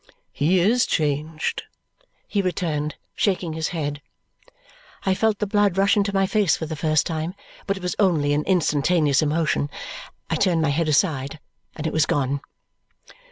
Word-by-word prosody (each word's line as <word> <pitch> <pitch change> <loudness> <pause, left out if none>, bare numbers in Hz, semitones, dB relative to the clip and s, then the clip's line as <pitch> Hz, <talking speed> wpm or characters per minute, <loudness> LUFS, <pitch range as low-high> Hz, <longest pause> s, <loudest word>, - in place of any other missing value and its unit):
"He 170 +6 +2
is 225 +7 +3
changed," 155 +1 -1 0.7
he 205 - 0
returned, 160 -5 -2 0.2
shaking 180 -5 0
his 160 0 -2
head. 145 -4 -3 1.0
I 190 - +3
felt 220 +2 +1
the 210 - -1
blood 205 -2 +2
rush 195 +1 +4
into 200 -1 +1
my 195 -1 +2
face 205 -2 +2
for 160 - -4
the 160 0 -5
first 155 0 +1
time, 165 +2 -3 0.3
but 195 0 0
it 190 - -10
was 180 - -2
only 160 -8 +3
an 150 +1 +1
instantaneous 155 -4 +2
emotion. 150 -2 0 0.6
I 165 - -1
turned 170 -3 +2
my 150 - +2
head 155 +3 0
aside, 145 -2 +1 0.4
and 155 - -6
it 160 - -1
was 155 -1 +2
gone. 140 0 0
160 Hz, 160 wpm, -23 LUFS, 150-190 Hz, 1.0 s, rush